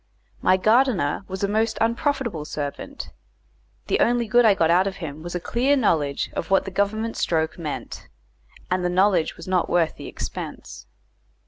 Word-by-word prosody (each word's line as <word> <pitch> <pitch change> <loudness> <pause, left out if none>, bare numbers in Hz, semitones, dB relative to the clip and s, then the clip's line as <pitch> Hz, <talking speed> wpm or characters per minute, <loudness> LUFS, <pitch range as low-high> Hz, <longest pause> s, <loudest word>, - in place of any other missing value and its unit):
My 185 0 +4
gardener 215 - +2
was 190 +1 -5
a - - +3
most 220 +2 0
unprofitable 235 - 0
servant; 150 - -6 0.7
the - - 0
only 240 -1 +2
good 240 +2 +4
I 210 -3 +6
got 165 -3 +2
out 185 +3 +4
of 195 - -3
him 155 -5 -7
was 175 +2 -6
a - - 0
clear 255 +9 +1
knowledge 150 - 0
of - - -4
what 195 - +3
the 195 - -5
Government 215 +4 -1
stroke 160 0 -1
meant, 155 -3 -6 0.6
and 185 0 +1
the 180 - +1
knowledge 180 -2 +2
was - - -10
not 185 -2 +1
worth 170 -2 +1
the - - -8
expense. - - -7
190 Hz, 170 wpm, -23 LUFS, 170-225 Hz, 0.7 s, I